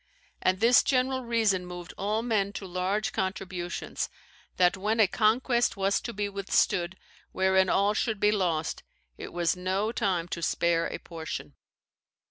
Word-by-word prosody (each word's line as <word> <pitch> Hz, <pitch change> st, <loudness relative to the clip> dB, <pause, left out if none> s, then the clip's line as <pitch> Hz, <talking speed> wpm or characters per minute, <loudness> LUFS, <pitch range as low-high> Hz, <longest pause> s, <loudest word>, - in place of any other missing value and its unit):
And 185 Hz, 0 st, +2 dB
this 235 Hz, +3 st, +6 dB
general 260 Hz, 0 st, +1 dB
reason 220 Hz, -6 st, +1 dB
moved 175 Hz, -1 st, -8 dB
all 210 Hz, +3 st, -1 dB
men 205 Hz, -4 st, 0 dB
to 195 Hz, -, -6 dB
large 185 Hz, +4 st, -1 dB
contributions, 185 Hz, -2 st, -3 dB, 0.5 s
that 180 Hz, 0 st, +4 dB
when 210 Hz, +4 st, -1 dB
a 220 Hz, -, +7 dB
conquest 235 Hz, +4 st, +2 dB
was 195 Hz, 0 st, +1 dB
to 235 Hz, -, -5 dB
be 205 Hz, -1 st, -2 dB
withstood 190 Hz, -2 st, 0 dB, 0.4 s
wherein 190 Hz, 0 st, +3 dB
all 200 Hz, +2 st, +3 dB
should 220 Hz, -1 st, -1 dB
be 210 Hz, +1 st, +4 dB
lost, 175 Hz, -6 st, -1 dB, 0.4 s
it -, -, -7 dB
was 175 Hz, +1 st, +1 dB
no 190 Hz, +4 st, -1 dB
time 185 Hz, -7 st, 0 dB
to 170 Hz, -, -4 dB
spare 165 Hz, 0 st, +1 dB
a -, -, -5 dB
portion." 165 Hz, -2 st, -7 dB
195 Hz, 150 wpm, -28 LUFS, 180-215 Hz, 0.5 s, a